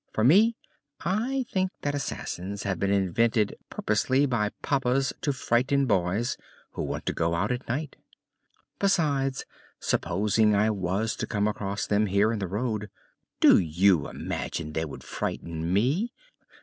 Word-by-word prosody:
For 110 - 0
me, 210 - +6 0.5
I 240 +9 0
think 185 -1 +1
that 145 - 0
assassins 100 -8 -4
have 95 -3 -2
been 100 - +1
invented 100 +3 +2
purposely 135 +2 +1
by 115 -6 0
papas 135 -1 +1
to 145 - +1
frighten 135 +2 +1
boys 100 +2 0 0.3
who - - -5
want - - -4
to - - -1
go 85 0 0
out 100 +7 0
at 125 +1 -3
night. 145 +4 -3 0.8
Besides, 145 -9 +1 0.3
supposing 105 +4 +2
I 105 +2 +3
was 100 +3 -1
to - - -3
come 105 -1 0
across 100 -1 -2
them 105 +1 +2
here 100 +3 +3
in 115 - -2
the 95 - -2
road, 105 +1 -2 0.5
do - - +7
you 85 0 +3
imagine 75 -2 -4
they 80 +1 -1
would 75 - -9
frighten 85 0 -4
me? 140 - +1
110 Hz, 150 wpm, -27 LUFS, 100-135 Hz, 0.8 s, do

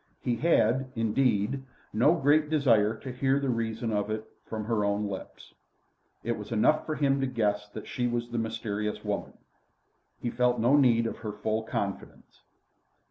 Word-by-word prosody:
He 120 -2 0
had, 130 -4 +2
indeed, 115 +2 +1 0.3
no 125 +10 +4
great 150 0 +3
desire 115 -8 +3
to 130 - -7
hear 135 +2 +1
the 140 -1 -1
reason 115 0 -2
of 105 0 0
it 110 0 -3 0.2
from 110 -1 -4
her 110 -2 0
own 100 +1 0
lips. 95 -1 -8 0.7
It 120 - -1
was 105 - -8
enough 115 +7 +2
for 155 - -1
him 140 -2 +2
to 135 - +1
guess 105 -4 -1
that - - -8
she 120 -1 -1
was 120 0 -2
the 120 - -1
mysterious 105 -2 -3
woman. - - -3 0.9
He 120 - -3
felt 125 -1 +2
no 120 +5 +4
need 120 -5 +4
of 115 - -4
her 110 -2 -4
full 110 +1 -1
confidence. 100 -3 -5
115 Hz, 170 wpm, -28 LUFS, 110-130 Hz, 0.9 s, no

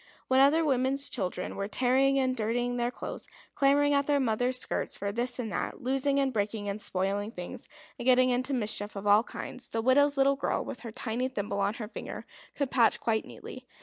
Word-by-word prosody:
When 260 0 +4
other 300 +4 +5
women's 270 0 +2
children 180 -5 -3
were 200 - -3
tearing 260 +4 +2
and 260 -1 +1
dirtying 245 +2 -1
their 240 0 0
clothes, - - -7 0.3
clamouring 285 +1 +3
at 280 0 +2
their 290 -1 +3
mothers' 250 0 0
skirts - - -2
for 200 0 -2
this 240 +4 -2
and 230 -4 -4
that, - - -4
losing 270 +2 +1
and 270 -2 +1
breaking 205 -1 -2
and 200 +1 -3
spoiling 200 +2 -1
things, 180 -5 -8 0.3
and - - -5
getting 255 0 +5
into 255 +3 0
mischief 215 -4 -1
of 200 +1 -6
all 205 +1 +6
kinds, 245 +1 -4
the 225 - -2
widow's 280 +4 +3
little 275 +1 +4
girl, - - -1
with - - -6
her 230 - -8
tiny 230 +3 -2
thimble 205 -5 -3
on 200 +2 0
her 220 -3 -6
finger, - - -7 0.3
could 280 -3 -2
patch 235 -3 +3
quite 220 -1 0
neatly. - - -10
245 Hz, 205 wpm, -29 LUFS, 215-270 Hz, 0.3 s, all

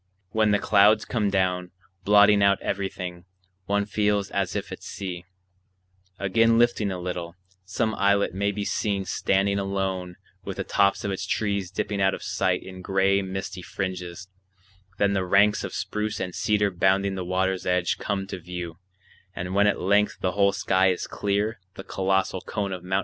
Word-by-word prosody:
When 110 0 +2
the 105 - +4
clouds 105 +1 +4
come 110 -4 0
down, 90 -2 0 0.4
blotting 105 0 +6
out 100 -1 +4
everything, 90 -3 -4 0.4
one 100 0 +1
feels 105 -1 0
as - - -1
if - - -4
at - - -7
sea; 90 -2 -6 0.9
again 115 +4 +3
lifting 120 -3 +2
a 95 - -3
little, 90 -1 -5 0.3
some 110 +4 -1
islet 100 -1 +2
may 100 +2 0
be 105 0 -4
seen 100 -2 -1
standing 100 +2 +1
alone 95 -2 -2 0.3
with - - -6
the - - -2
tops 100 -1 +2
of 100 - -1
its 95 0 -4
trees 100 -4 -1
dipping 100 +2 -2
out 95 0 +3
of - - -10
sight 95 -1 0
in 95 -1 -9
gray 95 +1 +2
misty 95 -1 -5
fringes; 90 -1 -5 0.7
then 100 0 +2
the 95 -1 +1
ranks 100 +3 +3
of - - -4
spruce 105 0 -3
and 90 - -4
cedar 105 0 +1
bounding 95 +2 +2
the 95 -1 -4
water's 95 +1 -1
edge 90 -1 +1
come 100 -2 -2
to 95 - -6
view; 90 -1 -7 0.6
and 90 +1 -4
when 100 +1 +4
at 105 - +1
length 100 +3 +2
the 90 - 0
whole 100 +1 +3
sky 95 -1 +2
is 90 -1 0
clear 100 +2 -1 0.2
the 95 - -8
colossal 95 -1 0
cone 100 -3 -3
of 90 -1 -7
Mt. 95 +1 0
95 Hz, 175 wpm, -25 LUFS, 95-100 Hz, 0.9 s, blotting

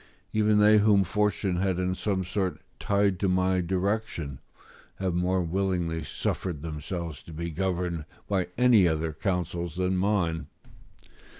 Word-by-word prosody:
Even 105 -1 +3
they 105 +1 +6
whom 105 -2 +5
fortune 100 -1 0
had 95 -1 0
in 90 0 0
some 95 0 -1
sort 95 0 -2 0.2
tied 100 -3 +1
to 100 - +1
my 95 0 +2
direction, 90 -6 -2 0.6
have 95 -2 -2
more 90 +1 +1
willingly 85 -2 -1
suffered 75 +2 -3
themselves 80 0 -5
to - - -13
be 85 +2 -4
governed 90 -2 -2 0.2
by 95 -3 0
any 120 -7 +6
other 80 0 -1
counsels 85 -1 -2
than 90 +1 0
mine. 90 -6 0
90 Hz, 135 wpm, -27 LUFS, 85-100 Hz, 0.6 s, they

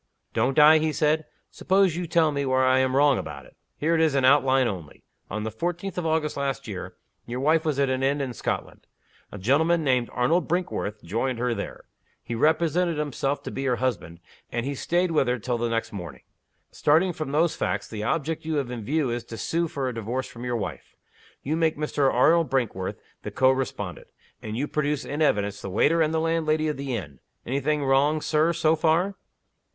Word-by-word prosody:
"Don't 125 +4 +1
I?" 155 +1 +8
he 155 0 0
said. 155 +2 +1 0.2
"Suppose 190 -3 +2
you 175 0 -3
tell 160 -1 +3
me 140 -1 -1
where 130 -1 +2
I 130 0 +4
am 130 0 +1
wrong 140 -2 +4
about 70 -3 -7
it? - - -19 0.2
Here 160 +3 +1
it 165 - +3
is 155 -3 +2
in 135 -2 +3
outline 135 -1 +4
only. 90 -8 -7 0.3
On 110 - -3
the 110 - -3
fourteenth 175 - -3
of 180 -2 -2
August 160 -1 0
last 135 -1 -2
your 95 -3 -6 0.3
wife 145 +7 +1
was 155 -4 -1
at 140 -1 +2
an 130 0 -1
inn 140 +2 +1
in 135 -3 -3
Scotland. - - -4 0.4
A - - -7
gentleman 160 - +2
named 125 -4 +1
Arnold 160 +9 +1
Brinkworth 170 - -2
joined 115 +8 -2
her 120 0 0
there. 100 - -6 0.4
He 120 - -5
represented 160 +5 +2
himself 145 -1 -2
to - - -6
be 135 - -4
her 125 -2 +2
husband, 105 -9 -3 0.3
and 120 0 -2
he 140 - -2
staid 175 +5 0
with 150 -5 +2
her 125 +1 +1
till 120 +1 -2
the 120 0 0
next 115 -1 -2
morning. 85 -10 -8 0.5
Starting 170 +5 +2
from 155 -3 -5
those 160 +2 +2
facts, 100 +2 -2
the 110 -2 -6
object 155 +8 -1
you 160 0 -2
have 135 -4 -1
in 120 -3 -5
view 145 +2 0
is 120 0 -3
to 115 - -8
sue 170 +9 -1
for 140 -4 -3
a 125 - -2
Divorce 115 +4 -3
from 120 - -10
your 125 -1 -1
wife. 110 - -6 0.5
You 150 +4 -1
make 160 -2 +1
Mr. 145 -2 +1
Arnold 160 +6 +4
Brinkworth 115 -8 -1 0.2
the - - -5
co 130 0 +3
respondent. 130 -1 -4 0.3
And 110 +1 -5
you 145 +4 -1
produce 150 -1 -1
in 145 +2 -4
evidence 105 -8 +1
the 100 - -5
waiter 150 - +3
and 155 -1 +2
the 160 - +1
landlady 160 -1 +1
of 150 - -3
the 135 -2 -3
inn. 70 - -7 0.3
Any 135 +3 -1
thing 150 +1 0
wrong, 140 +3 +3
Sir, 155 +2 +2
so 165 -1 +2
far?" 165 +5 +2
140 Hz, 210 wpm, -25 LUFS, 120-160 Hz, 0.5 s, I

